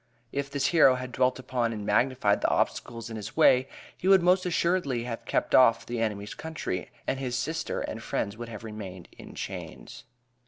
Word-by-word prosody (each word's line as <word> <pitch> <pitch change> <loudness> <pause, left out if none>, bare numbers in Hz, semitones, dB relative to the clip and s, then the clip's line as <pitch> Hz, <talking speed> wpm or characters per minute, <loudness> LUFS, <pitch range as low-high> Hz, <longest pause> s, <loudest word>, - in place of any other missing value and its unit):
If 140 0 -3
this 140 0 -1
hero 140 -6 +6
had 125 0 -6
dwelt 125 0 +1
upon 125 -2 -1
and 105 -2 -5
magnified 105 -1 +2
the - - +2
obstacles 115 0 -1
in 110 - -5
his 105 - -8
way 130 -4 +5 0.3
he 185 - -4
would 190 -2 +6
most 180 +1 +3
assuredly 170 -8 0
have 120 -1 -6
kept - - -1
off 120 -3 +6
the 120 -1 -3
enemy's 105 -2 -2
country, 160 -12 -5 0.2
and 135 - -1
his 125 -2 -2
sister 160 +4 -2
and - - -5
friends 100 - -2
would 120 +1 -7
have 110 -1 -8
remained 100 -5 -8
in - - -11
chains. 110 0 -7
125 Hz, 190 wpm, -28 LUFS, 110-140 Hz, 0.3 s, hero